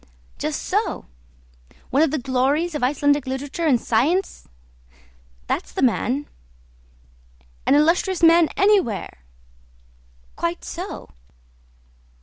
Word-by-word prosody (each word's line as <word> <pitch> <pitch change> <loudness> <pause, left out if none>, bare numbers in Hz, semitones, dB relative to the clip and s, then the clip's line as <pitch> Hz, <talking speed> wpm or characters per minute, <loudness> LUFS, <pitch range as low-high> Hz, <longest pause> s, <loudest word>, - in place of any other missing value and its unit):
"Just - - -3
so!" - - -2 0.9
"One 275 - +3
of 320 - +4
the 310 - -1
glories 275 +6 0
of 295 - -3
Icelandic 285 +1 +1
literature 285 +5 -3
and 255 -5 +3
science?" 315 - 0 1.0
"That's - - -3
the - - -2
man." 255 +3 +1 1.4
"An - - +5
illustrious 335 +4 +2
man 330 0 +6
anywhere!" 380 - +1 1.2
"Quite 340 +1 -3
so." 365 +4 -7
295 Hz, 100 wpm, -22 LUFS, 265-340 Hz, 1.4 s, man